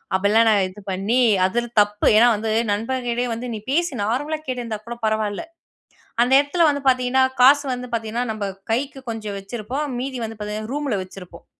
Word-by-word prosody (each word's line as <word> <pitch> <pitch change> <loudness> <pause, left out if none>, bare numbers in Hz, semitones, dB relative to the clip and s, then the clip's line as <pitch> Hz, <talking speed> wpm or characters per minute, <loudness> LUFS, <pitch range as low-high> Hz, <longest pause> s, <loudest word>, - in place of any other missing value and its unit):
அப்படிலாம் 210 +4 +3
நாங்க 205 -3 +3
இது 190 +3 -13
பண்ணி, 200 +7 0 0.3
அதில் 240 +5 -1
தப்பு. 205 0 0
ஏன்னா 230 +3 +7
வந்து 220 +1 -2 0.2
நண்பன் 245 +5 -2
கிட்டயே 240 +1 -1
வந்து, 235 +2 -5
நீ - - -5
பேசு, 340 +4 +1
நார்மலா 290 +9 -1
கேட்டிருந்தா 240 -4 -3
கூட 235 0 -6
பரவால்ல. 215 -2 -1 0.8
அந்த 245 +2 +3
இடத்துல 290 +5 +1
வந்து 285 -1 -1
பாத்தீங்கன்னா, 255 +1 +2 0.2
காசு 285 +3 +7
வந்து 250 0 -6
பாத்தீங்கன்னா 225 +1 -2
நம்ப 215 -2 -4 0.3
கைக்கு 270 +4 -1
கொஞ்சம் 215 -3 -5
வச்சிருப்போம். 240 +8 -4
மீதி 260 +1 -4
வந்து 225 0 -8
பாத்தீங்கன்னா 210 +2 -5
ரூம்ல 285 -5 -1
வச்சிருப்போம். 185 -1 -13
230 Hz, 170 wpm, -22 LUFS, 210-260 Hz, 0.8 s, ஏன்னா